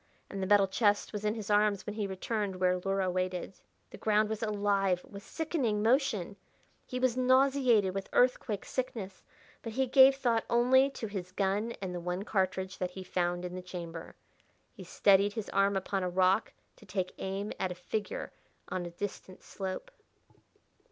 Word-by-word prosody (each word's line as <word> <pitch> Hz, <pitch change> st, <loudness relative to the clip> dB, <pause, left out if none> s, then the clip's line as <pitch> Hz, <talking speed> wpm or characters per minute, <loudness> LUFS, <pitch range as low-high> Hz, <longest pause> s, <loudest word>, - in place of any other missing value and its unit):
And 195 Hz, -, -4 dB
the 190 Hz, -, -1 dB
metal 200 Hz, -1 st, +5 dB
chest 205 Hz, +2 st, +1 dB
was 210 Hz, 0 st, -4 dB
in 210 Hz, +1 st, 0 dB
his 215 Hz, -1 st, -5 dB
arms 205 Hz, -1 st, +3 dB
when 210 Hz, -, -4 dB
he 210 Hz, -2 st, -2 dB
returned 195 Hz, +1 st, -3 dB
where 180 Hz, 0 st, +1 dB
Luhra 195 Hz, +1 st, 0 dB
waited. 185 Hz, +1 st, -3 dB, 0.3 s
The -, -, -11 dB
ground 215 Hz, 0 st, +2 dB
was 220 Hz, -1 st, -3 dB
alive 200 Hz, -4 st, +1 dB
with 200 Hz, -1 st, -10 dB
sickening 255 Hz, -8 st, -1 dB
motion, 225 Hz, -, +1 dB, 0.5 s
he 250 Hz, -, -4 dB
was 255 Hz, -2 st, +2 dB
nauseated 255 Hz, -5 st, +3 dB
with 195 Hz, 0 st, -4 dB
earthquake 245 Hz, -4 st, +1 dB
sickness, 220 Hz, -7 st, -4 dB, 0.4 s
but 230 Hz, -, -6 dB
he 265 Hz, +3 st, +1 dB
gave 265 Hz, +1 st, +7 dB
thought 235 Hz, -4 st, +1 dB
only 255 Hz, +3 st, +4 dB
to 270 Hz, -, -6 dB
his 190 Hz, -4 st, -5 dB
gun 200 Hz, +4 st, 0 dB
and 185 Hz, -1 st, -3 dB
the 175 Hz, -, -3 dB
one 180 Hz, +2 st, -3 dB
cartridge 190 Hz, -2 st, -1 dB
that 180 Hz, -, -1 dB
he 185 Hz, +1 st, -8 dB
found 175 Hz, -1 st, -1 dB
in 180 Hz, -, -5 dB
the 185 Hz, -, -5 dB
chamber. 170 Hz, -2 st, -8 dB, 0.6 s
He -, -, -11 dB
steadied 200 Hz, +1 st, +3 dB
his 220 Hz, -2 st, -5 dB
arm 195 Hz, 0 st, +2 dB
upon 195 Hz, +1 st, -2 dB
a 180 Hz, -, -1 dB
rock 185 Hz, +3 st, +2 dB, 0.3 s
to -, -, -16 dB
take 185 Hz, -2 st, -2 dB
aim 195 Hz, +2 st, -3 dB
at 185 Hz, -, -1 dB
a -, -, -5 dB
figure 215 Hz, -, -4 dB, 0.4 s
on 180 Hz, -1 st, -3 dB
a -, -, -6 dB
distant 185 Hz, +1 st, -7 dB
slope. 195 Hz, -, -6 dB
200 Hz, 180 wpm, -31 LUFS, 185-225 Hz, 0.6 s, gave